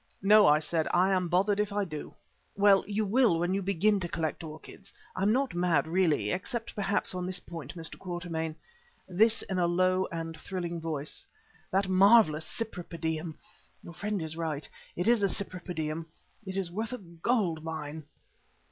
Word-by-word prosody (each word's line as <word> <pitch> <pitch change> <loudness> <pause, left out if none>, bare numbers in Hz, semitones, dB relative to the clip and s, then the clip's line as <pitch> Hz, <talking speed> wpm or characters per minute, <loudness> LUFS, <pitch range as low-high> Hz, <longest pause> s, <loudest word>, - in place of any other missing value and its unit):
"No," 210 +1 +7
I 150 - +6
said, 160 +1 -1
"I 185 +2 +3
am 185 -2 +1
bothered 195 +4 +2
if 210 0 0
I 205 0 0
do." 155 -4 -7 0.4
"Well, 200 -1 +6
you 210 +1 0
will 220 -3 +3
when 175 +2 0
you 195 - 0
begin 200 +2 +2
to 175 -2 -4
collect 160 0 -2
orchids. 155 -1 -10 0.2
I'm 195 +3 +2
not 260 -2 +1
mad, 175 -5 +2
really, 160 - +1
except 230 +4 -3
perhaps 200 -1 0
on 180 0 -3
this 185 0 -2
point, 165 -5 -8
Mr. 165 -2 -4
Quatermain," 170 -3 -4 0.5
this 220 +5 +3
in 190 -2 -2
a 175 - +3
low 185 +2 +2
and 165 -1 -4
thrilling 170 0 -5
voice 155 - -4 0.5
"that 195 +1 +1
marvellous 190 -5 +5
Cypripedium 165 -6 -4 0.5
your 170 - -10
friend 205 -1 -2
is 160 0 -4
right, 160 -3 -3 0.3
it 175 - -1
is 235 -2 +4
a 200 - +3
Cypripedium 165 -5 -4 0.4
is 190 -2 -2
worth 220 +6 -3
a - - -3
gold 170 -2 -1
mine." 155 -1 -5
180 Hz, 165 wpm, -29 LUFS, 160-200 Hz, 0.5 s, No